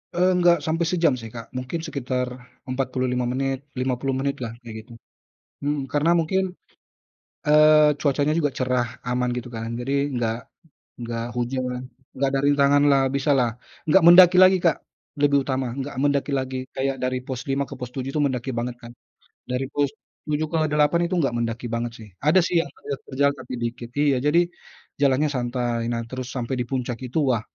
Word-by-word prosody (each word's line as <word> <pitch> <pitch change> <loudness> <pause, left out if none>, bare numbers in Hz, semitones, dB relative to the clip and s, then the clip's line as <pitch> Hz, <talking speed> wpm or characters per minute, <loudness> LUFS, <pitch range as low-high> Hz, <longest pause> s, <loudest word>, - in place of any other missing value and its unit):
Enggak 175 -3 +3
sampai 165 +2 0
sejam 165 -5 +2
sih, 115 - -8
Kak. 115 0 -10
Mungkin 130 +6 -4
sekitar 125 -3 -2 0.4
45 130 -1 -1
menit, 135 +2 -2
50 130 +1 -1
menit 140 +1 -2
lah, 115 -2 -5
kayak 115 -2 -9
gitu. - - -16 0.7
Mhm, 145 0 -1
karena 150 +3 +2
mungkin, 180 +4 +1 1.1
eee, 150 -1 +6
cuacanya 145 +1 +1
juga 145 -3 +1
cerah, 125 -2 -1
aman, 125 0 0
gitu 125 0 -5
kan. 115 -1 -5
Jadi 135 +3 -3 0.2
enggak 115 -2 -1 0.6
enggak 115 -1 -4
hujan, 125 0 -2 0.4
enggak 140 - +2
ada 135 - +2
rintangan 145 0 +4
lah, 135 -1 +4
bisalah. 135 -4 +2 0.4
Enggak 165 +4 +5
mendaki 180 +1 +9
lagi, 185 0 +7
Kak, 170 -2 +2 0.5
lebih 140 -1 +4
utama, 130 -2 -1
nggak 140 +1 -4
mendaki 145 0 +1
lagi, 130 -1 -2 0.2
kayak 135 0 -1
dari 130 0 0
pos 130 -2 -4
5 140 +1 +1
ke 140 - -9
pos 125 -2 -6
7 135 0 -3
itu - - 0
mendaki 130 0 -2
banget 120 +1 -2
kan. 115 - -9 0.6
Dari 125 +1 -1
pos 145 -1 +1 0.4
7 150 +1 0
ke 165 - -1
8 150 +3 +3
itu - - +2
nggak 135 -5 +1
mendaki 115 +1 -2
banget 115 0 -2
sih. 110 -1 -11 0.2
Ada 170 +5 +5
sih 175 - 0
yang - - -9
terjal-terjal, 140 0 -1
tapi - - -9
dikit. 120 0 -5
Iya, 145 -3 +3
jadi 170 +4 +5 0.6
jalannya 140 +2 +3
santai, 120 -2 -1
nah, 115 - -1
terus 130 0 -5
sampai 125 +2 -2
di - - 0
puncak 125 -3 -2
itu, 125 +6 -2
wah! 115 - 0
135 Hz, 175 wpm, -24 LUFS, 125-145 Hz, 1.1 s, mendaki